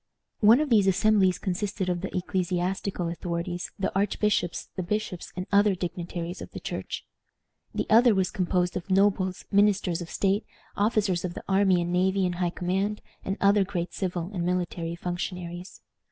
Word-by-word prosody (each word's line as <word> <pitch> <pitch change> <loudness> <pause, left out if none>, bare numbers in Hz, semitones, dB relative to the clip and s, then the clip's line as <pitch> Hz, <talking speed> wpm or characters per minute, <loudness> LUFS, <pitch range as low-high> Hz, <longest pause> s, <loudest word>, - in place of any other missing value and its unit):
One 225 +4 +7
of 300 -3 -1
these 205 -4 +5
assemblies 190 -1 +4
consisted 195 0 -2
of 175 -1 -1
the 190 0 -3
ecclesiastical 180 0 -1
authorities, 170 +1 -3
the 195 - -1
archbishops, 200 -2 0
the 185 - -2
bishops, 210 -1 -3
and 180 0 -3
other 200 -1 +4
dignitaries 175 0 -5
of - - -9
the - - -5
Church. - - -5 0.7
The - - 0
other 230 0 +6
was 190 -1 +1
composed 180 -1 0
of 180 +2 -5
nobles, 190 -1 +2
ministers 200 -4 +3
of 170 - -7
state, 200 +2 +1 0.3
officers 205 -4 +1
of 180 -1 -4
the - - -7
army 190 -2 +3
and 175 +1 -3
navy 190 +1 +2
in 180 - 0
high 175 0 0
command, 190 +4 -2 0.2
and 195 +2 -2
other 200 0 +4
great 180 -3 -3
civil 180 -1 -3
and 180 -3 -2
military 175 -1 -2
functionaries. 175 0 -5
185 Hz, 165 wpm, -27 LUFS, 175-200 Hz, 0.7 s, One